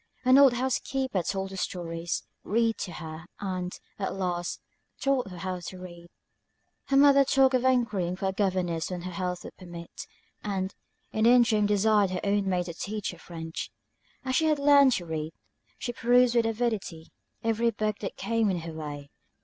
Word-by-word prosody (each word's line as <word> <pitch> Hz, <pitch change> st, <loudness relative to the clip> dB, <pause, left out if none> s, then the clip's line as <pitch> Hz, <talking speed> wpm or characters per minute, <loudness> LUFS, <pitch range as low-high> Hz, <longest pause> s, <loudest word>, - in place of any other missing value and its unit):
An 260 Hz, +2 st, +7 dB
old 275 Hz, -3 st, +7 dB
house 255 Hz, +1 st, 0 dB
keeper 260 Hz, -8 st, -1 dB
told 190 Hz, +2 st, -3 dB
her -, -, -7 dB
stories, 170 Hz, -2 st, -3 dB, 0.2 s
read 230 Hz, +1 st, +1 dB
to 180 Hz, -3 st, -4 dB
her, 160 Hz, 0 st, -8 dB
and, 185 Hz, -2 st, -3 dB, 0.3 s
at 195 Hz, -, -2 dB
last, 175 Hz, -2 st, -2 dB, 0.4 s
taught 270 Hz, -6 st, +1 dB
her 180 Hz, 0 st, -5 dB
to 185 Hz, +2 st, -7 dB
read. 175 Hz, -1 st, -10 dB, 0.8 s
Her 275 Hz, -, +2 dB
mother 280 Hz, 0 st, +7 dB
talked 270 Hz, 0 st, +4 dB
of 255 Hz, -1 st, +2 dB
enquiring 220 Hz, -9 st, +1 dB
for 190 Hz, -, -4 dB
a -, -, -3 dB
governess 185 Hz, -5 st, 0 dB
when 180 Hz, -2 st, -5 dB
her 185 Hz, -, -5 dB
health 180 Hz, 0 st, -3 dB
would -, -, -10 dB
permit; 175 Hz, -2 st, -9 dB, 0.4 s
and, 195 Hz, -2 st, -2 dB, 0.4 s
in 220 Hz, 0 st, +1 dB
the -, -, +7 dB
interim 235 Hz, -4 st, +5 dB
desired 210 Hz, -1 st, +3 dB
her 185 Hz, 0 st, -3 dB
own 200 Hz, -1 st, +1 dB
maid 180 Hz, -1 st, 0 dB
to 170 Hz, -, -6 dB
teach 205 Hz, +4 st, -4 dB
her 175 Hz, -, -13 dB
French. 165 Hz, -1 st, -6 dB, 0.6 s
As 260 Hz, 0 st, 0 dB
she 320 Hz, -, +3 dB
had 305 Hz, -1 st, +3 dB
learned 280 Hz, -2 st, +6 dB
to 175 Hz, -, -2 dB
read, 160 Hz, -1 st, -4 dB, 0.4 s
she 240 Hz, -, -4 dB
perused 245 Hz, 0 st, +4 dB
with 230 Hz, -1 st, +3 dB
avidity 220 Hz, -8 st, -2 dB, 0.3 s
every 225 Hz, +1 st, +2 dB
book 215 Hz, -1 st, -2 dB
that 195 Hz, -, -5 dB
came 230 Hz, -2 st, +1 dB
in 180 Hz, -3 st, -1 dB
her 165 Hz, 0 st, -7 dB
way. 145 Hz, -2 st, -7 dB
195 Hz, 180 wpm, -28 LUFS, 175-235 Hz, 0.8 s, An